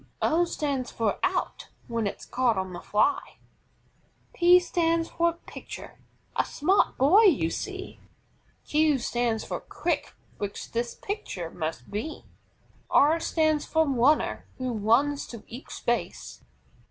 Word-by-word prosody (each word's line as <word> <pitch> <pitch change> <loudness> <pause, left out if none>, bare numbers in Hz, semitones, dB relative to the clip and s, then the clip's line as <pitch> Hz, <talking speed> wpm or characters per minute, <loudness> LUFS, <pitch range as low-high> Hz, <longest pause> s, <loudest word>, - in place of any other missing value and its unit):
O 340 +2 +3
stands 280 -6 -2
for 220 -3 -1
OUT, 370 -1 -1 0.2
when 230 -3 -1
it's - - -6
caught 245 -4 +1
on 190 -1 -3
the - - -6
fly. 290 - 0 1.0
P 355 +1 +6
stands 335 -2 0
for 340 0 +1
PITCHER, - - -9 0.4
a - - +3
smart 375 +7 +1
boy 365 - +6
you 245 - +4
see. 385 -1 -6 0.7
Q 305 -1 +3
stands 240 -2 -1
for - - -4
QUICK, - - -3 0.2
which 205 -1 -5
this 235 +1 -2
pitcher 190 - -5
must 155 -7 -5
be. 225 +10 -5 0.6
R 310 +4 +5
stands 310 -2 +1
for 320 -1 +2
RUNNER, 275 +3 +2
who 255 -1 -2
runs 235 +7 +2
to 230 -3 -9
each 245 +4 -9
base. 240 0 -2
280 Hz, 130 wpm, -27 LUFS, 230-330 Hz, 1.0 s, P